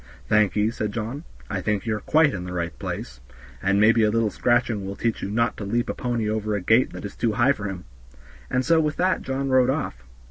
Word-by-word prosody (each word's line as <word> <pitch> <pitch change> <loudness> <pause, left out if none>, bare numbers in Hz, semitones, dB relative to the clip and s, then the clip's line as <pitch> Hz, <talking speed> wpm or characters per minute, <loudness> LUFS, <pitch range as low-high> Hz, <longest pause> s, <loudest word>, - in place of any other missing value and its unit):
"Thank 105 -2 +3
ye," 105 +1 +2
said 105 -2 -3
John, 120 +8 -5 0.2
"I - - -3
think 105 -2 -1
you 110 -2 0
are - - -4
quite 155 +2 +3
in 90 - -4
the 90 - -6
right 85 -2 -2
place, - - -6 0.4
and 100 +1 +2
maybe 115 +2 +5
a 105 - +4
little 110 -1 +1
scratching 120 -3 +1
will 100 +1 -5
teach 115 +1 -1
you - - -3
not 115 +3 +1
to - - -5
leap 120 +4 -1
a - - -4
pony 120 -3 -2
over 110 0 -1
a - - 0
gate 110 +7 +3
that - - -7
is 100 - -7
too 115 -2 0
high 125 +4 +4
for 105 -7 -3
him," 95 -3 -5 0.6
and 125 0 0
so 165 -1 +4
with 150 -1 0
that 185 +1 +1
John 135 +1 -2
rode 130 -1 +4
off. 100 - -2
110 Hz, 245 wpm, -24 LUFS, 100-125 Hz, 0.6 s, maybe